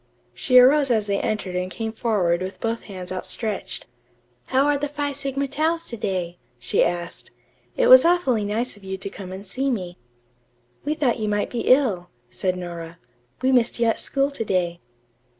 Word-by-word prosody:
She 255 -1 +3
arose 275 +3 +6
as 220 -4 +2
they 200 -1 0
entered 205 -4 -2
and 180 0 -1
came 220 +3 -4
forward 190 -7 +1
with 185 +1 -5
both 230 0 -3
hands 185 -3 -8
outstretched. 200 +3 -3 0.6
"How 265 +2 +2
are 290 0 +3
the 290 +1 -1
Phi 290 0 -3
Sigma 275 0 -2
Taus 325 +4 -1
to 235 - -5
day?" 180 -5 -3 0.2
she 120 - +2
asked. 175 0 -3 0.5
"It - - +3
was - - +9
awfully 330 -11 +2
nice 220 +5 -2
of 205 - -18
you 190 0 -4
to 195 - -5
come 185 -2 -8
and 190 +2 -8
see 260 +9 -2
me." 180 -8 -4 0.8
"We 300 +2 -1
thought 260 -6 +1
you 215 -1 -1
might 205 0 -1
be 240 - -3
ill," 220 -10 +3 0.2
said 185 -1 -1
Nora. 170 -2 -7 0.5
"We 260 - +3
missed 245 -2 +2
you 235 - +3
at 225 - +1
school 275 0 +1
to 280 - -3
day." 175 -4 -1
220 Hz, 185 wpm, -23 LUFS, 185-275 Hz, 0.8 s, was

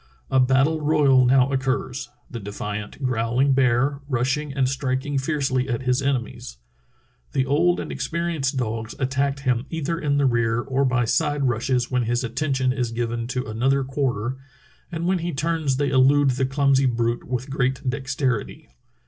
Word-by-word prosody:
A 130 - +4
battle 135 +5 +3
royal 145 -4 +4
now 130 +1 +4
occurs, 130 -1 -2 0.2
the 120 - -7
defiant, 105 +4 -6
growling 125 +3 +1
bear, 135 +2 +2
rushing 135 +4 0
and 135 -1 +1
striking 135 +1 -1
fiercely 135 -2 -1
at 120 +1 -2
his 125 +1 +1
enemies. 125 - -3 0.8
The 130 - +1
old 165 +6 +2
and - - -5
experienced 165 -5 -2
dogs 115 -2 -3
attack 135 +1 -1
him 125 -1 0
either 165 +1 -2
in 145 -2 0
the 140 - +2
rear 120 -2 +2
or 135 +2 0
by 125 -2 +1
side 145 +3 +1
rushes 120 +1 0
when 125 -2 +1
his 120 +2 0
attention 130 +1 0
is 125 -3 -2
given 115 0 -2
to 125 0 -3
another 130 +5 +1
quar 135 -1 -1 0.2
ter, 130 - -9 0.5
and 170 0 -3
when 185 0 +1
he 170 +1 -3
turns 155 -3 0
they 145 0 +1
elude 135 +1 +4
the 130 +1 0
clumsy 135 -1 +3
brute 120 -1 -1
with 125 +2 -4
great 130 0 -1
dexterity. 130 -3 -2
130 Hz, 165 wpm, -23 LUFS, 125-140 Hz, 0.8 s, A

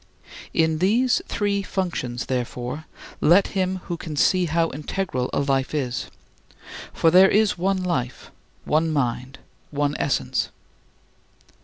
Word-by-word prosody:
In 160 -1 +1
these 235 +8 +3
three 200 -1 0
functions, 165 -11 -3
therefore, 125 +3 -3 0.3
let 175 +6 +5
him 185 -1 -1
who 170 - -4
can 160 -2 -6
see 180 +5 +3
how 165 0 +1
integral 150 -3 -3
a - - 0
life 135 +1 0
is; 130 -4 -2 0.8
for 165 - +3
there 185 +2 +7
is 215 -1 +3
one 185 +1 0
life, 130 -9 -3 0.3
one 160 +2 +2
mind, 130 -2 -2 0.3
one 145 0 -1
essence. 140 - 0
160 Hz, 125 wpm, -23 LUFS, 135-185 Hz, 0.8 s, there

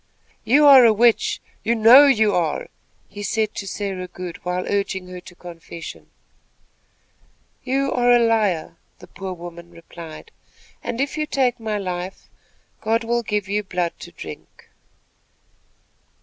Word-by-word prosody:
"You 290 +5 +4
are 275 -3 +9
a 230 - +7
witch. 230 +2 +2 0.2
You 235 - +1
know 240 +6 +8
you 220 -6 +3
are," 165 -4 -1 0.4
he 205 - -10
said 215 +1 -1
to 200 - -6
Sarah 190 -2 -4
Good, 180 -1 -9
while 180 0 -2
urging 195 -2 -2
her 180 0 -8
to 175 - -14
confession. 170 -1 -10 1.5
"You 270 +1 0
are 245 -1 +3
a 245 - +7
liar," 210 -9 +1 0.2
the - - -14
poor 190 -1 -7
woman 170 -1 -10
replied, 170 - -12 0.5
"and, 235 - -4
if 280 +3 -2
you 305 - -1
take 255 -4 0
my 220 -2 -3
life, 185 -1 -6 0.5
God 225 +2 0
will 235 +1 0
give 210 -3 -2
you 205 +2 0
blood 180 -4 -2
to - - -10
drink." - - -12
205 Hz, 145 wpm, -21 LUFS, 180-235 Hz, 1.5 s, are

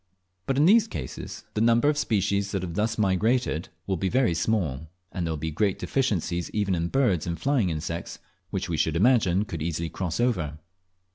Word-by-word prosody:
But 135 - 0
in 145 - +5
these 220 +4 +6
cases - - -7
the 105 - -1
number 115 +4 +4
of 150 - +3
species 100 -7 0
that 95 -2 -1
have 85 -2 -4
thus 110 +3 0
migrated 105 -2 +1 0.2
will 95 -1 -1
be 95 +2 -1
very 125 -5 +2
small, 80 -6 -1 0.2
and 90 -3 -2
there - - -1
will 80 - -2
be 80 +2 -3
great 95 +5 +1
deficiencies 90 - -1
even 105 -3 +1
in 85 -1 0
birds 100 - +1
and 85 -1 -3
flying 135 -9 +1
insects, 85 +1 -4 0.3
which - - -3
we - - -2
should 80 - +1
imagine 105 -2 +3
could 85 -6 -6
easily 85 +1 -2
cross 85 -2 -3
over. 90 -12 0
95 Hz, 195 wpm, -26 LUFS, 85-115 Hz, 0.3 s, these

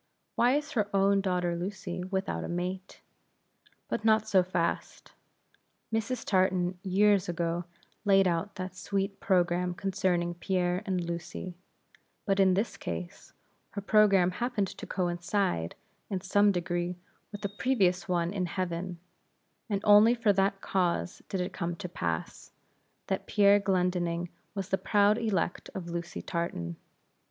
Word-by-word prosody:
Why 245 +2 +4
is 295 +1 -2
her 210 -4 0
own 195 0 +4
daughter 180 -2 0
Lucy 180 0 -4
without 190 +1 -2
a - - -4
mate? 180 +2 -4 0.9
But 215 - -2
not 220 -1 +4
so 195 -3 +5
fast; 180 -2 -2 0.8
Mrs. 225 +2 -1
Tartan 185 -1 +1
years 195 0 +3
ago 170 0 -1 0.4
laid 195 -2 +5
out 175 +3 -1
that 185 0 -5
sweet 195 +2 -2
programme 180 -1 +1
concerning 185 -3 0
Pierre 180 0 0
and 185 -2 0
Lucy; 170 +1 -5 0.7
but 195 -1 +1
in 190 -1 +5
this 200 0 -1
case, 85 +1 -6 0.4
her 200 - -3
programme 195 -3 +4
happened 215 -1 -1
to - - -9
coincide, 175 - -1 0.3
in 190 - -1
some 205 +2 +4
degree, 175 -1 -2 0.4
with 205 -1 -6
a - - 0
previous 195 -5 +1
one 175 0 0
in 185 -3 -1
heaven, 175 0 -3 0.7
and 200 -2 0
only 210 +3 +7
for 225 -3 +3
that 195 0 +1
cause 180 -1 -1
did 190 - -2
it 180 - -3
come 170 0 -3
to 185 0 -6
pass, 85 - -4 0.5
that - - -3
Pierre 205 0 +5
Glendinning 180 -3 0 0.3
was 195 -1 -4
the 190 - +1
proud 205 +3 +3
elect 195 -6 -1
of 175 -2 -5
Lucy 170 0 -5
Tartan. 85 - -3
185 Hz, 140 wpm, -29 LUFS, 175-200 Hz, 0.9 s, only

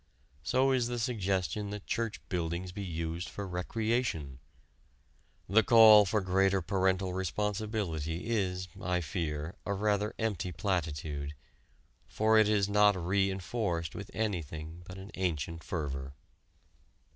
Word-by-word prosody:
So 130 - +2
is 125 -3 +2
the 120 0 -3
suggestion 105 -3 -1
that 105 0 -6
church 115 0 -3
buildings 85 +1 -2
be 100 +2 -5
used 85 -1 -4
for 100 -1 -6
recreation. 90 - -1 1.1
The 105 +5 +5
call 110 -1 +8
for 105 +2 +1
greater 95 +1 +2
parental 95 0 0
responsibility 95 -4 -2
is, 95 -5 -1
I 90 0 0
fear, 80 -2 -3
a 100 - -2
rather 105 +1 0
empty 105 -6 -2
platitude, 75 -5 -2 0.7
for 110 +1 +3
it 110 -1 +4
is 105 -2 +3
not 105 0 +5
re 95 +2 +1
enforced 95 -4 -2
with 105 0 -7
anything 85 -6 -4
but 95 - -8
an 95 +2 -9
ancient 85 -3 -2
fervor. 70 -4 -4
95 Hz, 125 wpm, -31 LUFS, 85-105 Hz, 1.1 s, call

